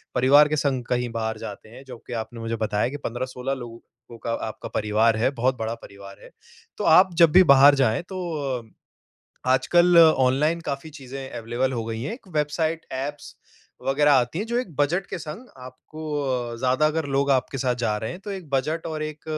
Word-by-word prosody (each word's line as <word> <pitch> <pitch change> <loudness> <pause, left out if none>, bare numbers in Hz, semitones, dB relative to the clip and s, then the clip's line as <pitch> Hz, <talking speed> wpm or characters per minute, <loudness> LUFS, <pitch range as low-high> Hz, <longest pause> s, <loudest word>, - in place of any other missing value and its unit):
परिवार 140 +4 +6
के 155 - -1
संग 135 -4 0
कहीं 125 0 -1
बाहर 110 0 -2
जाते 105 0 -9
हैं, 120 +4 -13
जो 125 - -9
कि - - -6
आपने 115 +1 -13
मुझे 115 0 -3
बताया 105 +2 0
कि 145 - -6
15-16 125 +2 -3
लोगों 120 -3 -8 0.3
को 120 - -12
का 115 - -2 0.2
आपका 110 - -9
परिवार 110 +1 +2
है, 115 - +2
बहुत 130 +1 +2
बड़ा 115 0 -3
परिवार 100 0 -13
है। - - -14 0.5
तो - - -4 0.2
आप 185 -1 +2
जब 165 -2 +7
भी 185 +4 +7
बाहर 140 +1 +7
जाएँ 110 -3 +1
तो 190 -1 -5 0.4
अ, 110 - -21 0.8
आजकल 175 +6 +4
ऑनलाइन 155 0 +4
काफ़ी 140 0 -5
चीज़ें 135 -2 -9
अवेलेबल 120 +3 -2
हो 115 -2 -3
गई 115 0 -4
हैं। 140 - -4
एक 235 -3 -13
वेबसाइट, 160 +2 -1
ऐप्स 145 +3 -6 0.5
वग़ैरह 145 +2 +3
आती 130 +4 +1
हैं, 210 - -2
जो 235 +1 -2
एक 185 - -6
बजट 160 +7 +1
के - - -4
संग, 165 +11 -8
आपको 130 0 -12 0.4
अ, 125 -3 -2
ज़्यादा 130 +4 +1
अगर 160 0 -2
लोग 140 +1 +1
आपके 130 +1 0
साथ 125 -1 0
जा 115 -3 -1
रहे 110 +1 -4
हैं, 175 - -8
तो 200 +1 -7
एक 185 -6 -7
बजट 150 +4 -1
और 155 -1 -4
एक 155 0 -7
130 Hz, 205 wpm, -24 LUFS, 120-155 Hz, 0.8 s, जब